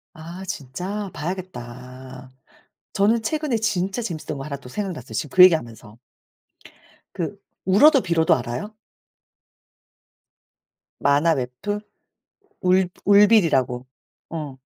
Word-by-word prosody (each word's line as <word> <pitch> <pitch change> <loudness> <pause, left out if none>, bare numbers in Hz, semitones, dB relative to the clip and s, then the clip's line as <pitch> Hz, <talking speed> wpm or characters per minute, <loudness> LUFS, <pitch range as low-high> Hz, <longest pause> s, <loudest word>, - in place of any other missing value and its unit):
아, 170 +4 -9
진짜? 185 +6 -5
봐야겠다. 130 -7 -8 0.6
저는 215 +4 +2
최근에 300 +1 -1
진짜 205 -1 -1
재밌었던 155 -9 -5
거 135 - -6
1 140 -1 -5
또 125 -2 -13
생각났어요 160 - -5
지금 150 - -3
그 185 - +8
얘기 180 -2 +9
하면서. 115 -5 -7 1.2
그 - - -4 0.3
울어도 265 - +6
빌어도 170 -3 +2
알아요? 125 - -5 2.3
만화 145 +4 +3
웹툰? 130 +12 -4 0.8
울 185 -1 +3 0.2
울빌이라고. 170 - +4 0.4
어. 150 -5 -6
165 Hz, 220 characters per minute, -23 LUFS, 130-200 Hz, 2.3 s, 얘기